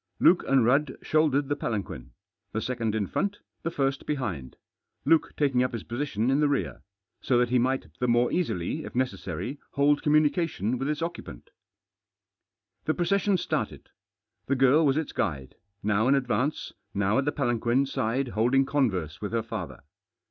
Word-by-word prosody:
Luke 175 Hz, -, +5 dB
and 135 Hz, -4 st, +4 dB
Rudd 135 Hz, +3 st, +2 dB
shouldered 145 Hz, -3 st, +2 dB
the 145 Hz, -, 0 dB
palanquin; 95 Hz, -, -4 dB, 0.4 s
the 110 Hz, -, 0 dB
second 115 Hz, -2 st, -2 dB
in 105 Hz, -2 st, 0 dB
front, 200 Hz, -, -2 dB, 0.2 s
the 165 Hz, -, -2 dB
first 135 Hz, -4 st, -1 dB
behind— 100 Hz, -, -3 dB, 0.5 s
Luke 165 Hz, -1 st, +3 dB
takirig 145 Hz, -2 st, +2 dB
U£ 125 Hz, 0 st, +3 dB
hfe 115 Hz, -4 st, -7 dB
"position 120 Hz, -2 st, -1 dB
in 135 Hz, -, +2 dB
the 150 Hz, -1 st, +3 dB
rear, 140 Hz, -, -2 dB, 0.4 s
so 125 Hz, -, +2 dB
that 120 Hz, -1 st, +2 dB
he 125 Hz, 0 st, +3 dB
might 130 Hz, +2 st, 0 dB
the 125 Hz, -, +1 dB
HiOrg 120 Hz, +1 st, +2 dB
easily, 140 Hz, -, -1 dB
if -, -, -8 dB
ttecessafy, 120 Hz, -, -3 dB
hold 145 Hz, +1 st, +3 dB
communication 150 Hz, -, +1 dB
with 135 Hz, +2 st, -1 dB
its 150 Hz, +1 st, -2 dB
bceujpant. 170 Hz, -, -6 dB, 1.4 s
The -, -, +1 dB
procession 200 Hz, +2 st, +2 dB
started. -, -, -3 dB, 0.6 s
The 140 Hz, -, +2 dB
girl 135 Hz, +4 st, +5 dB
Was 135 Hz, +1 st, +2 dB
its 160 Hz, -, -2 dB
guide, 70 Hz, -8 st, -2 dB, 0.3 s
now 105 Hz, +4 st, +2 dB
ih 140 Hz, -, +5 dB
advance, 130 Hz, +2 st, -1 dB, 0.2 s
how 100 Hz, +4 st, +2 dB
at 135 Hz, -, 0 dB
the 145 Hz, -, +1 dB
palanquin 120 Hz, -1 st, +1 dB
side 130 Hz, 0 st, -1 dB
holding 125 Hz, +5 st, +2 dB
converse 100 Hz, -, -1 dB
with 105 Hz, +1 st, -4 dB
her 115 Hz, -1 st, 0 dB
father. 110 Hz, -6 st, -6 dB
130 Hz, 165 wpm, -27 LUFS, 110-145 Hz, 1.4 s, Luke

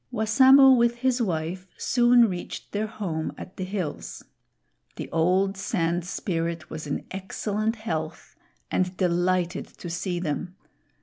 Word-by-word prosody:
Wassamo 260 Hz, +4 st, +6 dB
with 235 Hz, -2 st, +4 dB
his 255 Hz, 0 st, 0 dB
wife 180 Hz, -1 st, -2 dB
soon 240 Hz, -1 st, +4 dB
reached 180 Hz, -3 st, -6 dB
their 210 Hz, +1 st, -1 dB
home 175 Hz, -8 st, -3 dB
at 185 Hz, -, -10 dB
the 185 Hz, -, -4 dB
hills. 185 Hz, -5 st, -5 dB, 0.7 s
The -, -, -6 dB
old 185 Hz, +4 st, +2 dB
Sand 170 Hz, -2 st, -1 dB
Spirit 170 Hz, -4 st, -3 dB
was 155 Hz, -1 st, -6 dB
in 145 Hz, -, -3 dB
excellent 210 Hz, +3 st, -2 dB
health 160 Hz, -8 st, -5 dB, 0.4 s
and 185 Hz, 0 st, 0 dB
delighted 180 Hz, 0 st, 0 dB
to 175 Hz, -, -7 dB
see 175 Hz, +1 st, -2 dB
them. 175 Hz, +2 st, -3 dB
185 Hz, 130 wpm, -26 LUFS, 170-220 Hz, 0.7 s, Wassamo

